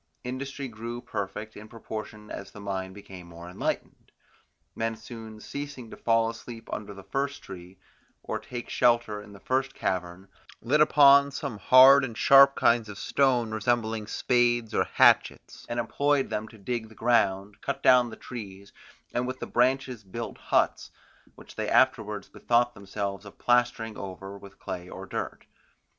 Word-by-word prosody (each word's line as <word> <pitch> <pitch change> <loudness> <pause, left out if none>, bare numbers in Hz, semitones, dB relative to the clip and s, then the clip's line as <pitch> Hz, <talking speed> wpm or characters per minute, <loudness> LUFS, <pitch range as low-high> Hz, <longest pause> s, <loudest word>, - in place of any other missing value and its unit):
Industry 135 +2 -5
grew 115 +1 -6
perfect 105 -1 -5
in 105 +1 -10
proportion 110 -1 -8
as - - -7
the - - -13
mind 95 -2 -4
became 95 -3 -11
more 85 0 -11
enlightened. 90 - -4 0.6
Men 115 0 -2
soon 110 -1 -10
ceasing 140 -1 -7
to - - -8
fall 115 -1 +2
asleep 115 0 -8
under 105 -1 -6
the 100 - -11
first 140 +8 -3
tree, 90 0 -11 0.5
or - - -3
take 120 -1 -7
shelter 120 -4 +2
in 105 0 -14
the 100 - -13
first 130 +4 -1
cavern, 90 +1 -3 0.3
lit 145 +6 +2
upon 140 -2 +7
some 135 -6 -5
hard 130 +6 +8
and 115 -4 -5
sharp 140 0 +7
kinds 115 -2 +2
of 105 - -8
stone 125 +1 +1
resembling 110 0 -1
spades 120 -2 +1
or - - +2
hatchets, - - +2
and 120 0 -2
employed 140 +4 0
them 110 +1 -2
to 110 - -15
dig 110 +2 -4
the 110 - -16
ground, 100 -3 +1
cut 140 0 -4
down 125 -1 +6
trees, 100 -5 -9 0.4
and 125 +1 -1
with 130 0 -4
the - - -5
branches 125 -2 0
build 115 +5 -7
huts, - - 0 0.5
which - - -14
they - - -3
afterwards 110 -6 +2
bethought 120 0 +1
themselves 100 -1 -5
of 105 - -13
plastering 120 -2 +1
over 95 +1 -8
with 100 -1 -13
clay 90 0 -7
or - - -8
dirt. - - -5
115 Hz, 160 wpm, -27 LUFS, 100-125 Hz, 0.6 s, hard